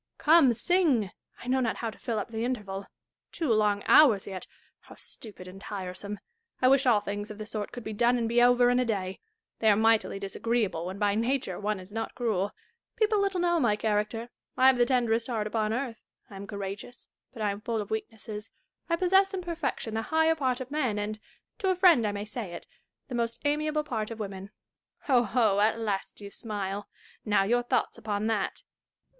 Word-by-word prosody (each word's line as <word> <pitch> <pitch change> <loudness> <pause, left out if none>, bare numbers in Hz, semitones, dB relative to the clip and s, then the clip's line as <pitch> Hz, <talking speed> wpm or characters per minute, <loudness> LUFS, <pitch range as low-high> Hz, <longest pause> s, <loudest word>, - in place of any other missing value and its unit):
Come, 305 -4 +6
sing. 265 - +2 0.3
I - - -9
know 260 +1 +2
not 235 -3 0
how 230 -2 -3
to - - -16
fill 230 -2 -2
up 210 - -4
the 225 0 -3
interval. 205 -6 -3 0.4
Two 305 -9 0
long 210 -2 +2
hours 230 -11 +6
yet! 190 -2 -7 0.2
— - - -37
how - - -13
stupid 205 -5 -8
and 190 +1 -11
tiresome! 200 0 -5 0.4
I 255 - +5
wish 270 0 +4
all 220 -4 +5
things 205 0 -4
of 215 - -8
the 215 - -6
sort 215 -1 -4
could 245 - -8
be 220 - -5
done 240 +3 +3
and 230 -1 0
be 235 +1 +3
over 245 0 +5
in 245 - +3
a - - +3
day. 195 -5 -2 0.4
They 220 - +4
are 205 - +6
mightily 220 -1 +3
disagreeable 195 -3 -1
when 190 +2 -5
by 205 -1 +2
nature 230 -3 -1
one 210 -1 -1
is 185 +2 -12
not 225 +1 -4
cruel. 210 -5 0 0.4
People 435 -2 +2
little 390 -2 0
know 345 -1 +2
my 235 -7 +3
character. 215 +2 -1 0.3
I 255 - +4
have 260 -1 +6
the 240 - +4
tenderest 235 -3 +1
heai't 225 -4 -1
upon 215 0 -1
earth. 240 0 -3 0.3
I - - -9
am 200 +1 -8
courageous, 200 +4 -7 0.2
but 225 -4 -6
I 205 - +2
am 200 +1 -6
full 225 0 -2
of 205 0 -5
weaknesses. 220 -1 -5 0.4
I 335 - +3
possess 385 +3 +3
in 365 - -4
perfection 320 -9 -3
the 225 - 0
higher 320 +6 +3
part 260 -5 -1
of 260 +1 -7
men, 260 -8 0
and 210 +1 -3 0.2
— - - -55
to 385 - +1
a 375 - +3
friend 345 - +5
I - - 0
may 205 0 -4
say 215 -4 -6
it - - -8 0.2
— - - -57
the 255 - -8
most 235 +1 -2
amiaV)le 300 +1 0
part 220 -7 -3
of 230 -1 -7
women. 195 -2 -6 0.5
Ho, 255 -4 +3
ho! 220 -3 +2
at 215 +2 +3
last 205 -4 -3
you 200 0 -8
smile: 205 -2 -4 0.3
now, 210 -2 +3
your 240 +5 +2
thoughts 245 0 -1
upon 210 -1 -2
that. 220 -3 -1
225 Hz, 215 wpm, -28 LUFS, 205-255 Hz, 0.5 s, Come